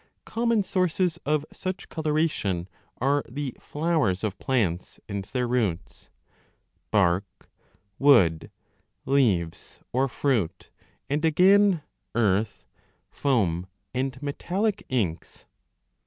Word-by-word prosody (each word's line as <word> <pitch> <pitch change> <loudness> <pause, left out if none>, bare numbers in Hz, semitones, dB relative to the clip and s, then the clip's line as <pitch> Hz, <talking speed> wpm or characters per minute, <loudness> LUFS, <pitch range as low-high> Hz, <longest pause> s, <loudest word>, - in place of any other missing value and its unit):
Common 230 -2 +1
sources 185 -2 0
of 150 0 +1
such 185 +1 -5
coloration 150 - -1 0.3
are 140 +3 +2
the 140 0 -4
flowers 150 - 0
of 105 -3 -2
plants 100 -10 -1
and 100 -2 -3
their 125 +2 -2
roots, 110 -8 -2 0.8
bark, 95 -1 0 0.5
wood, 95 - +5 0.6
leaves, 105 -12 +1
or 130 +2 +2
fruit, 125 - -1 0.4
and 145 +2 0
20 165 - +3
again, 190 +2 +5 0.3
earth, 105 -2 +1 0.5
foam, 95 - +1 0.3
and 130 0 -2
metallic 195 +8 -1
inks. 100 -11 -2
130 Hz, 95 wpm, -26 LUFS, 100-155 Hz, 0.8 s, wood